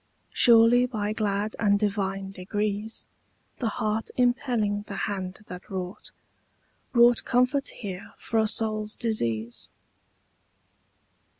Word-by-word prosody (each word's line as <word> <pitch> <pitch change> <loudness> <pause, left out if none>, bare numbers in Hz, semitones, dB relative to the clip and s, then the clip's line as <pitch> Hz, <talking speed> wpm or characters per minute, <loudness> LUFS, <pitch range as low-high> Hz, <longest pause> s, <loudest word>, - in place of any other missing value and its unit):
Surely 240 +1 +6
by 215 -4 -2
glad 210 0 -1
and 205 -2 +3
divine 195 -2 -1
degrees 205 +3 -3 0.5
The 240 - 0
heart 215 +1 -2
impelling 245 -5 +1
the 200 - -6
hand 190 -1 -4
that 180 -2 -10
wrought 185 +1 -6 0.8
Wrought 240 -1 +5
comfort 250 +3 +2
here 195 -3 -7
for 225 - -1
a 220 - +3
soul's 215 0 -1
disease. 120 - -2
210 Hz, 105 wpm, -26 LUFS, 195-230 Hz, 0.8 s, Surely